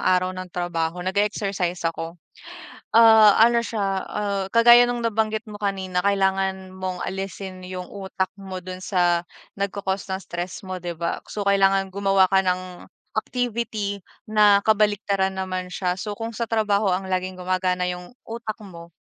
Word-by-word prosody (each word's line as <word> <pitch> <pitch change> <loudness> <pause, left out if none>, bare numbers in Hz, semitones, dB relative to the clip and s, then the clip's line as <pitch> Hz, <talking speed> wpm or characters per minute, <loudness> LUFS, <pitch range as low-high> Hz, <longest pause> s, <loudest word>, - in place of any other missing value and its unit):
araw 185 0 +2
ng 185 0 -7
trabaho, 175 0 -2
nage-exercise 190 -3 -1
ako. 165 +1 -3 0.8
Ah, 220 -2 +8
ano 235 0 +4
siya, 200 -5 -2
ah, 200 -2 -2
kagaya 240 +1 +8
no'ng 240 -1 -2
nabanggit 220 -1 0
mo 205 - -9
kanina, 190 -3 -1
kailangan 190 -1 0
mong 185 -1 -4
alisin 190 0 -5
yung 185 -1 -7
utak 190 -1 -3
mo 185 -2 -7
do'n 185 0 -7
sa, 175 -2 +2 0.4
nagko-cost 200 -1 -2
ng 190 0 -4
stress 175 +3 -6
mo, 185 -1 -5
'di 175 -1 -5
ba? 170 +1 -2
So, 205 - -4
kailangan 195 -1 +3
gumawa 195 -1 +3
ka 190 - +5
ng 185 -1 -2 0.3
activity 220 -5 -3 0.3
na 205 -2 +5
kabaliktaran 200 -3 +2
naman 185 -1 -3
siya, 180 0 -2
so, 210 0 -4
kung 225 +1 -5
sa 230 0 -3
trabaho 215 -2 +1
ang 190 +1 -1
laging 185 0 -1
gumagana 185 0 -1
yung 180 +5 -6
utak 225 -1 -5
mo, 170 -3 -11
190 Hz, 150 wpm, -23 LUFS, 185-205 Hz, 0.8 s, Ah